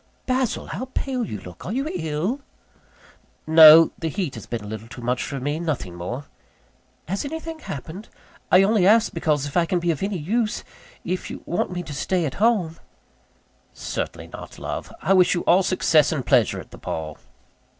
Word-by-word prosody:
"Basil, 255 Hz, -2 st, 0 dB
how 255 Hz, -, -5 dB
pale 260 Hz, -3 st, -1 dB
you 110 Hz, -, -5 dB
look! 90 Hz, -2 st, -11 dB
Are 180 Hz, -, -5 dB
you 270 Hz, +6 st, -1 dB
ill?" 165 Hz, -, -2 dB, 1.0 s
"No; 160 Hz, 0 st, +9 dB
the 165 Hz, -, -2 dB
heat 175 Hz, -5 st, -3 dB
has -, -, -9 dB
been 115 Hz, -3 st, -4 dB
a -, -, -8 dB
little 110 Hz, +1 st, -7 dB
too 120 Hz, +1 st, -10 dB
much 125 Hz, +1 st, 0 dB
for 140 Hz, -, -4 dB
me 145 Hz, +4 st, -2 dB
nothing 150 Hz, -, -3 dB
more." 105 Hz, +11 st, -5 dB, 0.8 s
"Has 195 Hz, +4 st, -2 dB
anything 320 Hz, +2 st, -6 dB
happened? 165 Hz, -, -8 dB, 0.4 s
I 185 Hz, +1 st, +7 dB
only 200 Hz, -2 st, +3 dB
ask, 225 Hz, +2 st, +4 dB
because 150 Hz, -4 st, 0 dB
if 145 Hz, -, -7 dB
I 170 Hz, -2 st, +3 dB
can 180 Hz, -, +1 dB
be 175 Hz, 0 st, +1 dB
of 155 Hz, -, -4 dB
any 195 Hz, 0 st, -1 dB
use 215 Hz, +8 st, -1 dB, 0.4 s
if 185 Hz, 0 st, -3 dB
you -, -, -8 dB
want 175 Hz, -, -1 dB
me 175 Hz, -1 st, -4 dB
to 155 Hz, -, -8 dB
stay 175 Hz, +4 st, 0 dB
at 140 Hz, -, -3 dB
home 195 Hz, -8 st, +2 dB, 0.5 s
" -, -, -38 dB, 0.2 s
"Certainly -, -, -4 dB
not, -, -, -10 dB
love. -, -, -5 dB
I 195 Hz, -, +3 dB
wish 185 Hz, -2 st, +5 dB
you 175 Hz, -, -1 dB
all 180 Hz, +3 st, +4 dB
success 165 Hz, -5 st, +3 dB
and 140 Hz, -6 st, -2 dB
pleasure -, -, +3 dB
at -, -, -12 dB
the -, -, -12 dB
ball." 80 Hz, -1 st, -5 dB
170 Hz, 190 wpm, -23 LUFS, 145-200 Hz, 1.0 s, No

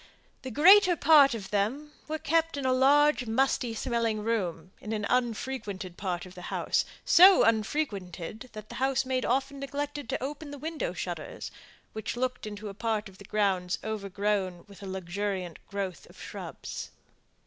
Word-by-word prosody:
The 260 Hz, -, -6 dB
greater 365 Hz, -, +7 dB
part 290 Hz, -5 st, +6 dB
of 200 Hz, -4 st, -7 dB
them 240 Hz, +9 st, -1 dB, 0.2 s
were 310 Hz, +1 st, -2 dB
kept 320 Hz, 0 st, +1 dB
in 275 Hz, -, -3 dB
a 260 Hz, -, +3 dB
large, 280 Hz, 0 st, +4 dB
musty 245 Hz, 0 st, +1 dB
smelling 225 Hz, -2 st, -1 dB
room, 185 Hz, -6 st, -2 dB
in 215 Hz, -, -4 dB
an 210 Hz, -1 st, -2 dB
unfrequented 230 Hz, -6 st, -2 dB
part 180 Hz, -2 st, -3 dB
of 180 Hz, -, -12 dB
the 180 Hz, -, -10 dB
house; -, -, 0 dB, 0.2 s
so 370 Hz, +2 st, +8 dB
unfrequented 215 Hz, -, -1 dB
that 215 Hz, -1 st, -9 dB
the -, -, -8 dB
housemaid 265 Hz, -1 st, +1 dB
often 275 Hz, +3 st, 0 dB
neglected 285 Hz, -1 st, -4 dB
to -, -, -2 dB
open 290 Hz, +2 st, -5 dB
the 285 Hz, -, -7 dB
window 315 Hz, +3 st, -3 dB
shutters, -, -, -5 dB, 0.4 s
which 220 Hz, +2 st, -4 dB
looked 250 Hz, -3 st, -2 dB
into 210 Hz, 0 st, -7 dB
a 200 Hz, -, -6 dB
part 220 Hz, 0 st, -2 dB
of 190 Hz, -, -18 dB
the 200 Hz, -, -11 dB
grounds 190 Hz, -4 st, 0 dB
over 215 Hz, -2 st, -4 dB
grown 195 Hz, -3 st, -1 dB
with 200 Hz, -1 st, -14 dB
the 200 Hz, -, -8 dB
luxuriant 190 Hz, -1 st, -4 dB
growth 195 Hz, -3 st, -5 dB
of -, -, -17 dB
shrubs. -, -, -7 dB
225 Hz, 165 wpm, -29 LUFS, 200-275 Hz, 0.4 s, so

